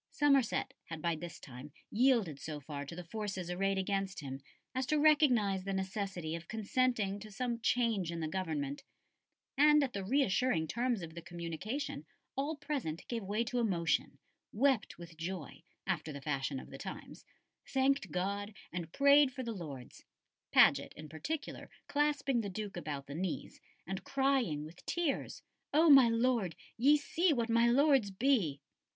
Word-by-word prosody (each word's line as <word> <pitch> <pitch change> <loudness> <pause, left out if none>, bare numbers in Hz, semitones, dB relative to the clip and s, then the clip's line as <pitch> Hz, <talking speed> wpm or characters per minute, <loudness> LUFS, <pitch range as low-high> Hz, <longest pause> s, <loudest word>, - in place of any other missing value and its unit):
Somerset 275 -5 +2
had 165 -1 -6
by 170 +1 0
this 170 +1 -8
time 135 +2 -10 0.2
yielded 225 - +3
so 150 +1 -5
far 145 0 -6
to 170 - -7
the 180 - -6
forces 190 -1 -4
arrayed 195 +2 0
against 195 0 -1
him 135 -1 -6 0.3
as 260 0 -1
to 305 - +2
recognise 250 -11 +4
the 195 +1 -3
necessity 190 -4 -3
of 170 0 -6
consenting 220 -2 0
to 215 +1 -10
some 235 +3 -2
change 225 -7 +1
in 170 - -4
the 160 - -2
government; 155 -6 -3 0.7
and 300 +1 +6
at 260 - -2
the 195 - -3
reassuring 215 - +2
terms 235 0 -1
of 160 -1 -8
the 170 - -7
communication 170 - -5 0.3
all 285 +4 -1
present 280 - -4
gave 230 -3 -2
way 210 +4 0
to 245 +1 -2
emotion; 175 -8 0 0.3
wept 255 -1 +1
with 170 -1 -11
joy, 165 -2 -5 0.2
after 165 -4 -2
the 140 - -6
fashion 135 -1 -2
of - - -12
the - - -9
times; - - -8 0.4
thanked 270 +1 +1
God, 200 +3 -2 0.2
and 170 -2 -4
prayed 280 +2 +6
for 260 0 -5
the 230 -1 -3
Lords; 145 - -8 0.5
Paget, 140 0 +5
in 155 0 -10
particular, 290 - -5 0.2
clasping 285 -4 +1
the 205 - -4
Duke 205 +1 -5
about 150 -5 -5
the 140 - -8
knees, 175 +3 -4 0.2
and 190 +2 -5
crying 265 - +1
with 165 +3 -13
tears, 340 -5 -2 0.3
"O 320 0 +7
my 265 -4 +9
Lord, 230 - +1 0.2
ye 280 +6 +5
see 330 +4 +1
what 235 -3 -1
my 230 +1 +4
lords 270 -3 +4
be!" 195 - +1
200 Hz, 165 wpm, -33 LUFS, 165-260 Hz, 0.7 s, my